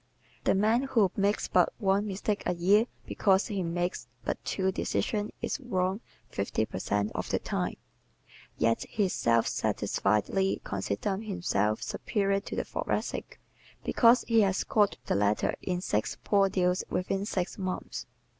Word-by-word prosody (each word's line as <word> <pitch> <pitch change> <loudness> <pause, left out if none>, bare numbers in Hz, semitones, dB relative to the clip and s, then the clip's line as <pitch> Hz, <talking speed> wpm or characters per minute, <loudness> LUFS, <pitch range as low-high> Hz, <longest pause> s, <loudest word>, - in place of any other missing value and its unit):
The - - +4
man 220 +5 +3
who 230 -8 +2
makes 200 +1 +1
but 180 -2 +3
one 200 0 +1
mistake 205 +1 -2
a 180 - +1
year 200 +7 +4 0.2
because 195 -1 +2
he 205 -4 -2
makes 175 -4 -2 0.2
but - - -2
two 190 -1 0
decisions 210 +2 -1
is - - -1
wrong 190 -5 -1 0.3
fifty 100 +2 -1
per 95 - -6
cent 105 +2 0
of - - -3
the - - +2
time. - - -2 0.8
Yet 115 0 +2
he 205 -3 +1
self 115 -8 +2
satisfiedly 105 - 0
considers 100 - -2
himself 110 - 0
superior 200 -2 0
to 200 - -7
the - - 0
Thoracic - - -3 0.4
because 235 0 +5
he 230 -1 +5
has 195 -2 +2
caught 205 -2 +2
the - - 0
latter 105 +1 +2
in 180 -1 -2
six 110 - -1
"poor 200 -2 +3
deals 180 -1 +1
within 190 +2 -1
six 190 -1 -2
months." 185 -1 -4
190 Hz, 150 wpm, -29 LUFS, 170-205 Hz, 0.8 s, because